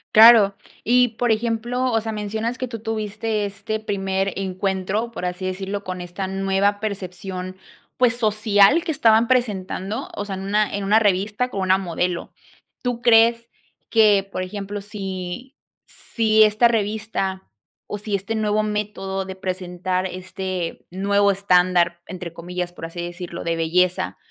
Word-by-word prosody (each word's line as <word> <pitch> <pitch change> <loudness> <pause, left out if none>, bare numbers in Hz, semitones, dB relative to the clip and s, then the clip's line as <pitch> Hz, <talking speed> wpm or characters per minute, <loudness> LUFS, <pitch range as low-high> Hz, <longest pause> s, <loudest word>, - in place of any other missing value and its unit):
Claro, 215 -3 +8 0.3
y 250 +1 +4
por 235 +1 0
ejemplo, 235 +3 0
o 225 -1 +2
sea, 220 0 -4
mencionas 220 +3 -3
que 255 - -3
tú 230 -2 -6
tuviste 215 0 -2
este 205 +2 -4
primer 195 -2 -1
encuentro, 190 +4 -2
por 225 - -7
así 180 +1 -3
decirlo, 195 +2 -3
con 185 -1 -5
esta 175 +2 -5
nueva 195 +1 +1
percepción, 185 -2 -5 0.4
pues, 245 -1 +3
social 215 - +4
que 335 - -2
estaban 230 -5 +4
presentando, 210 -2 -1
o 205 - -4
sea, 200 - -5
en 190 - -5
una 205 +2 0
en 200 - -3
una 205 +2 +4
revista 205 +3 +1
con 195 - -3
una 190 0 +3
modelo, 180 -1 -2 0.5
tú 245 -1 -2
crees 235 0 +5 0.4
que, 210 -3 +5
por - - -3
ejemplo, 200 +2 -5
si 195 +5 -6 0.3
si 220 -2 +2
esta 215 +3 +5
revista 210 -3 -2 0.4
o 205 - -5
si 210 -1 -2
este 200 +3 -3
nuevo 215 -1 +1
método 210 -2 -3
de 190 0 -7
presentar 185 0 -2
este 185 -1 -5
"nuevo 200 +2 +2
estándar", 180 -3 +2
entre 175 -3 -7
comillas, 175 +1 -5
por 165 - -7
así 175 +1 -9
decirlo, 175 0 -6
de 170 0 -1
belleza, 175 +3 +1
200 Hz, 150 wpm, -22 LUFS, 185-220 Hz, 0.5 s, Claro